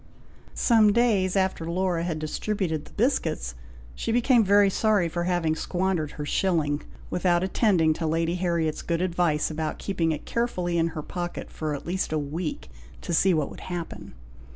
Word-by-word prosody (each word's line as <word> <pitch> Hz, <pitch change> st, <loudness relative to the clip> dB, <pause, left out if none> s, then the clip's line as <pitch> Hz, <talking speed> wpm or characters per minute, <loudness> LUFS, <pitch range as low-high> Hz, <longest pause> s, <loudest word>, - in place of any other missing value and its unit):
'" -, -, -26 dB
Some 220 Hz, -3 st, +5 dB
days 205 Hz, -6 st, +2 dB
after 190 Hz, -4 st, 0 dB
Laura 180 Hz, -1 st, 0 dB
had 170 Hz, -2 st, -2 dB
distributed 160 Hz, 0 st, -2 dB
the -, -, -16 dB
biscuits, -, -, 0 dB, 0.4 s
she 230 Hz, -, -3 dB
became 240 Hz, 0 st, +4 dB
very 200 Hz, 0 st, +5 dB
sorry 210 Hz, -4 st, +2 dB
for 175 Hz, +1 st, -2 dB
having 175 Hz, -3 st, +1 dB
squandered 175 Hz, -3 st, -1 dB
her 150 Hz, -, -5 dB
shilling, 150 Hz, -4 st, +1 dB, 0.3 s
without 175 Hz, -1 st, +2 dB
attending 185 Hz, -5 st, +3 dB
to 160 Hz, +1 st, -3 dB
Lady 165 Hz, +1 st, 0 dB
Harriet's 170 Hz, -3 st, 0 dB
good 170 Hz, +1 st, -1 dB
advice, 170 Hz, -4 st, +1 dB
about 155 Hz, 0 st, -3 dB
keeping 170 Hz, -5 st, -1 dB
it 155 Hz, -, -4 dB
carefully 180 Hz, -8 st, -1 dB
in 165 Hz, -, +2 dB
her 155 Hz, -, -3 dB
pocket 175 Hz, +1 st, -5 dB
for 155 Hz, -2 st, -3 dB
at 140 Hz, -, -8 dB
least 185 Hz, 0 st, -2 dB
a 155 Hz, -, +1 dB
week, 150 Hz, -, -4 dB, 0.3 s
to -, -, -4 dB
see 190 Hz, +3 st, +4 dB
what 155 Hz, -4 st, 0 dB
would -, -, -10 dB
happen. 165 Hz, -, -6 dB
175 Hz, 175 wpm, -26 LUFS, 155-190 Hz, 0.4 s, Some